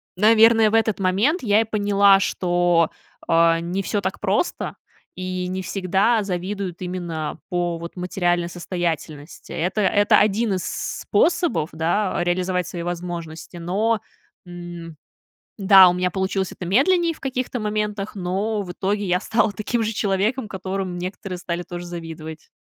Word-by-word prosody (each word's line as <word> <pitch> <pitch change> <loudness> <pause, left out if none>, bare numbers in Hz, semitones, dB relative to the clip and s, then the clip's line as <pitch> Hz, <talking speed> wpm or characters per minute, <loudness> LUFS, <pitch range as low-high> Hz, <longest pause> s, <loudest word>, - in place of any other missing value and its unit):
наверное, 225 +2 +5
в 220 - 0
этот 220 -2 +2
момент 205 - +2
я 210 -1 +3
и - - +2
поняла, 205 -2 +4
что, 175 -3 +1 0.4
а, 165 0 +4
не 175 +3 -2
всё 205 +2 -1
так - - -3
просто, - - -1 0.4
и 185 0 -3
не 185 +1 -3
всегда 195 +5 +1
завидуют 185 -1 -4
именно 175 -4 -4
по, 175 -2 -1
вот, 170 0 -8
материальной 175 -1 0
состоятельности. 170 -3 -5
Это 185 +5 -1
это 205 +1 +4
один 215 +1 +2
из 185 -2 -2
с - - -4
способов, 325 - +2
да, 175 +5 0
реализовать 180 0 0
свои 170 -1 -5
возможности. 170 -1 -6
Но, 205 +7 0 0.5
м, 175 -2 -9 0.6
да, 195 -2 +8
у - - +1
меня 180 0 0
получилось 190 0 -1
это 180 - -8
медленнее 335 - +3
в - - -19
каких-то 255 -2 -3
моментах, 210 -1 -2
но 200 +3 -1
в 180 -3 -6
итоге 200 +3 -1
я 180 -1 +1
стала 220 +2 +1
таким 215 +4 -2
же 220 +1 -2
человеком, 210 +5 0
которому 190 -1 -4
некоторые 185 +1 -5
стали 175 0 -3
тоже 175 0 -7
завидовать. 160 -2 -8
185 Hz, 150 wpm, -22 LUFS, 175-210 Hz, 0.6 s, да